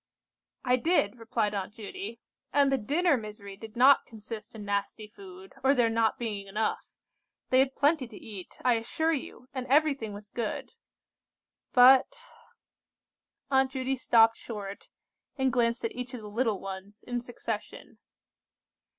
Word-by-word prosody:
"I 250 Hz, 0 st, +4 dB
did," 245 Hz, -, +2 dB
replied 225 Hz, -2 st, -1 dB
Aunt 200 Hz, +1 st, -4 dB
Judy, 235 Hz, -, -7 dB, 0.3 s
"and 280 Hz, -1 st, +4 dB
the 270 Hz, -, +3 dB
dinner 295 Hz, +7 st, +2 dB
misery 210 Hz, -3 st, -8 dB
did 220 Hz, +2 st, -11 dB
not 265 Hz, +4 st, +6 dB
consist 220 Hz, 0 st, -9 dB
in 210 Hz, -2 st, -8 dB
nasty 205 Hz, +1 st, -2 dB
food, 190 Hz, -2 st, -13 dB
or 270 Hz, +1 st, +5 dB
there 235 Hz, -3 st, +3 dB
not 225 Hz, -1 st, +2 dB
being 210 Hz, -4 st, -4 dB
enough. 210 Hz, +3 st, -2 dB, 0.6 s
They 255 Hz, -, +6 dB
had 265 Hz, 0 st, +2 dB
plenty 285 Hz, -2 st, +2 dB
to 225 Hz, -, -12 dB
eat, 200 Hz, -5 st, -10 dB
I 245 Hz, -2 st, +4 dB
assure 320 Hz, +8 st, 0 dB
you, 255 Hz, -3 st, -6 dB
and 260 Hz, -1 st, -4 dB
everything 275 Hz, -5 st, +2 dB
was 205 Hz, 0 st, -11 dB
good. 230 Hz, -3 st, -4 dB, 1.0 s
But—" 265 Hz, -, +6 dB, 1.3 s
Aunt 265 Hz, 0 st, +4 dB
Judy 265 Hz, 0 st, -2 dB
stopped 225 Hz, -3 st, +4 dB
short, 200 Hz, -3 st, -7 dB, 0.5 s
and 265 Hz, -2 st, +1 dB
glanced 235 Hz, -1 st, +1 dB
at 230 Hz, -, -1 dB
each 250 Hz, +1 st, -5 dB
of 240 Hz, -, -7 dB
the 210 Hz, -1 st, -9 dB
little 225 Hz, -3 st, 0 dB
ones 195 Hz, +2 st, -8 dB
in 245 Hz, -1 st, -3 dB
succession. 230 Hz, -3 st, -6 dB
230 Hz, 150 wpm, -29 LUFS, 210-260 Hz, 1.3 s, not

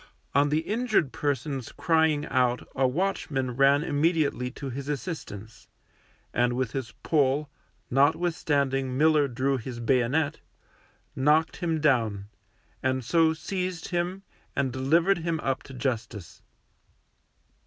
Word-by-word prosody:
On 145 Hz, +1 st, +4 dB
the 155 Hz, +2 st, +1 dB
injured 215 Hz, -, 0 dB
person's 135 Hz, -2 st, -2 dB
crying 160 Hz, -2 st, +2 dB
out 125 Hz, -1 st, +1 dB
a 130 Hz, 0 st, +3 dB
watchman 140 Hz, -4 st, -1 dB
ran 140 Hz, +3 st, +4 dB
immediately 145 Hz, -4 st, +1 dB
to 135 Hz, +1 st, -7 dB
his 140 Hz, +3 st, -6 dB
assistance, 120 Hz, -, -6 dB, 0.7 s
and 120 Hz, 0 st, +2 dB
with 125 Hz, -2 st, -1 dB
his 130 Hz, -4 st, -4 dB
pole, 145 Hz, -1 st, +1 dB, 0.4 s
notwithstanding 140 Hz, -3 st, +1 dB
Miller 155 Hz, -1 st, +4 dB
drew 135 Hz, +2 st, 0 dB
his 120 Hz, 0 st, -7 dB
bayonet, 130 Hz, +5 st, +1 dB, 0.8 s
knocked 150 Hz, +4 st, +2 dB
him 165 Hz, -3 st, -1 dB
down, 115 Hz, -9 st, +1 dB, 0.5 s
and 130 Hz, -1 st, -1 dB
so 160 Hz, +3 st, +3 dB
seized 180 Hz, +1 st, -4 dB
him 180 Hz, +2 st, -2 dB, 0.3 s
and 135 Hz, -3 st, 0 dB
delivered 165 Hz, +9 st, +2 dB
him 165 Hz, -1 st, -2 dB
up 135 Hz, -1 st, -1 dB
to 135 Hz, -, -12 dB
Justice. 115 Hz, -, -4 dB
140 Hz, 120 wpm, -27 LUFS, 130-160 Hz, 0.8 s, On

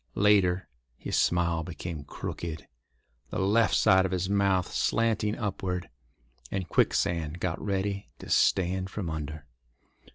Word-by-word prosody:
Later, 95 Hz, -3 st, +3 dB, 0.3 s
his -, -, -3 dB
smile 85 Hz, -1 st, +2 dB
became 80 Hz, -2 st, -6 dB
crooked, 80 Hz, +2 st, -6 dB, 0.6 s
the -, -, -4 dB
left 105 Hz, +4 st, +3 dB
side 95 Hz, 0 st, +5 dB
of 95 Hz, -, -1 dB
his 95 Hz, +1 st, -1 dB
mouth 100 Hz, -3 st, +2 dB
slanting 110 Hz, -2 st, +1 dB
upward, 95 Hz, -4 st, -3 dB, 0.6 s
and 95 Hz, -2 st, -3 dB
Quicksand 85 Hz, -2 st, +1 dB
got 90 Hz, -2 st, -2 dB
ready 100 Hz, 0 st, -2 dB
to -, -, -11 dB
stand 95 Hz, 0 st, +2 dB
from 95 Hz, -5 st, -4 dB
under. 75 Hz, -1 st, -5 dB
95 Hz, 125 wpm, -28 LUFS, 85-100 Hz, 0.6 s, side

